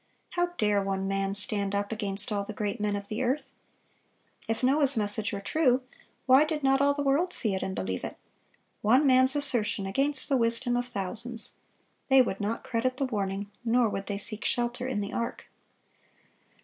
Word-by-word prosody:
How 350 0 +1
dare 210 -1 +2
one 195 0 -2
man 195 0 -1
stand 205 -1 -1
up 200 +1 -2
against 205 -1 -1
all 200 -1 -1
the 215 - -7
great 205 +1 -3
men 210 -1 0
of 200 0 -6
the 215 +4 -4
earth? 260 +4 -1 1.0
If 225 +3 -2
Noah's 275 0 +4
message 210 0 0
were 200 - -4
true, 255 +1 +1 0.4
why 260 +3 +6
did 305 -1 -3
not 270 0 +3
all 285 0 +3
the 285 - -2
world 305 +7 +1
see 215 -4 +3
it 190 - -2
and 190 - -3
believe 95 -1 -3
it? - - -6 0.6
One 255 +8 +4
man's 260 0 +5
assertion 245 -8 +1
against 275 +8 +3
the 275 -2 +2
wisdom 235 +1 +1
of 245 0 -1
thousands! 225 +3 -1 0.6
They 265 0 +6
would 195 -5 -4
not 215 +3 -3
credit 255 +2 -1
the 275 - 0
warning, 200 -4 -3
nor 240 0 +2
would 195 -1 -5
they 200 - -2
seek 215 +1 -3
shelter 245 +1 -1
in 235 -6 -2
the 200 - -5
ark. 235 0 -4
230 Hz, 190 wpm, -28 LUFS, 200-260 Hz, 1.0 s, why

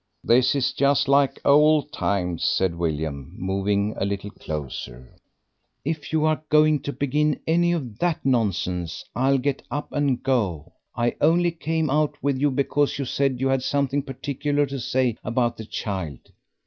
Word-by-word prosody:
"This 125 +3 +4
is 140 0 +1
just 140 0 +2
like 140 0 +3
old 150 +1 +5
times," 90 -4 -1
said 95 -2 +2
William, 80 -4 -3
moving 100 +2 0
a - - -1
little 100 +1 -3
closer. 65 - -7 0.7
"If 155 0 -3
you 155 -1 +2
are 155 0 +1
going 155 0 +4
to 145 - -4
begin 145 +3 0
any 175 +2 +3
of 130 -11 -4
that 175 -5 -1
nonsense 95 -9 -1
I'll 135 +2 +3
get 135 +1 -1
up 145 - -4
and 140 -4 0
go. 100 - -1 0.2
I 120 0 0
only 175 +1 +4
came 160 -2 -1
out 150 +1 +1
with 140 -2 +1
you 145 +1 +3
because 140 +2 0
you 140 - -2
said 130 0 0
you 135 +1 +1
had 135 -1 +1
something 140 +1 0
particular 140 +2 -1
to 135 0 -5
say 125 -1 0
about 120 0 0
the 110 - -7
child." 95 - -5
135 Hz, 160 wpm, -24 LUFS, 100-145 Hz, 0.7 s, old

